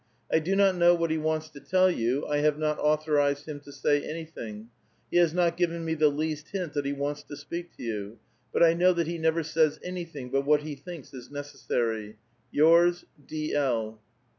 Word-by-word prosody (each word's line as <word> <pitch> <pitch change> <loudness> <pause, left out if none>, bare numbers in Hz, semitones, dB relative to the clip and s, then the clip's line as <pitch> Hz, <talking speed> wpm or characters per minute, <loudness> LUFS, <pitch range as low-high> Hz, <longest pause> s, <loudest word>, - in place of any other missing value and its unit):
I - - +4
do 180 +5 -1
not 195 -1 +5
know 175 0 +5
what 165 -1 0
he 160 - 0
wants 155 0 -1
to 150 -2 -12
tell 185 +4 +3
you; 125 0 0
I 145 - 0
have 150 0 +2
not 150 0 -1
authorized 150 -1 +1
him 150 -2 -5
to 145 0 -13
sav 145 +1 +1
anything; 120 -10 -7 0.4
he - - +2
has 170 -2 +5
not 170 0 +1
given 170 -1 0
me 160 - 0
the 155 -1 +4
least 155 +1 -3
hint 180 -6 -4
that 145 -1 -1
he - - 0
wants 145 +1 -3
to 145 0 -10
speak 170 +4 -7
to - - -9
yon, 105 -1 -4 0.3
but - - +3
I 165 -1 +6
know 180 +2 +4
tiiat 170 -1 +1
he 170 +1 -4
never 160 +1 +1
says 155 -1 +1
anything 165 -8 -6
but 135 0 +1
what 150 +1 +3
he 155 -1 -5
thinks 150 +1 -10
is 125 -2 -10
necessary. 115 -6 -3 0.3
Yours, 170 +3 +5 0.2
D. 155 0 -3
L." 115 -6 0
155 Hz, 210 wpm, -28 LUFS, 145-170 Hz, 0.4 s, I